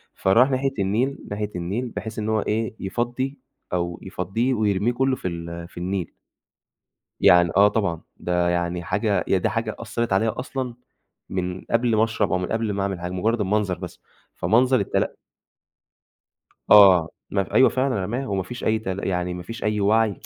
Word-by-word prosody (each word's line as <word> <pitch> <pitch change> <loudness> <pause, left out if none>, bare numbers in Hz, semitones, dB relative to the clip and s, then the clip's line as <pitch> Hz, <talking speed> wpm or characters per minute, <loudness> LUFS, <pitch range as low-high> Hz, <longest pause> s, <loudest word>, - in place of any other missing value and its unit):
فراح 115 +8 +4
ناحية 135 +1 0
النيل، 115 +8 0
ناحية 105 0 -2
النيل، 100 +9 -3
بحيث 110 +1 -6
إن 105 0 -2
هو 110 -1 +2
إيه، 110 +1 -2
يفضّي 120 +7 -3 0.3
أو 85 -1 -2
يفضّيه 95 +8 -1
ويرميه 105 0 +1
كلّه 130 +1 +1
في - - -5
ال 85 -1 -6
في - - -19
النيل. 90 0 -3 1.1
يعني 85 0 +6
آه 100 +1 +7
طبعًا 100 -6 -1 0.2
ده 90 0 0
يعني 85 0 -1
حاجة - - 0
هي - - +3
ده - - 0
حاجة - - -2
أثّرت 115 -3 -2
عليّا 110 +5 +1
أصلًا، 130 -1 -4 0.5
من 90 0 -3
قبل 115 -1 +2
ما 110 - +4
أشرب 110 -3 0
أو 90 - +2
من 90 - -3
قبل 110 -2 0
ما 100 0 -1
أعمل 95 -2 -2
حاجة. 90 +1 -4
مجرّد 110 +5 0
المنظر 100 -2 0
بس 90 -1 -8 0.4
فمنظر 125 +8 +3
التل 100 - 0 1.6
آه 95 -5 +8 0.2
ما 100 -1 +1
ف - - -13
أيوه 130 - +6
فعلًا 130 -7 0
رماه، 125 +7 -3
وما 95 -2 -1
فيش 120 +6 -8
أي 110 0 +2
تل 95 -2 -4
يعني 90 -1 -1
ما 90 0 -6
فيش 115 +5 -7
أي 105 0 0
وعي 105 0 +2
100 Hz, 180 wpm, -23 LUFS, 90-115 Hz, 1.6 s, آه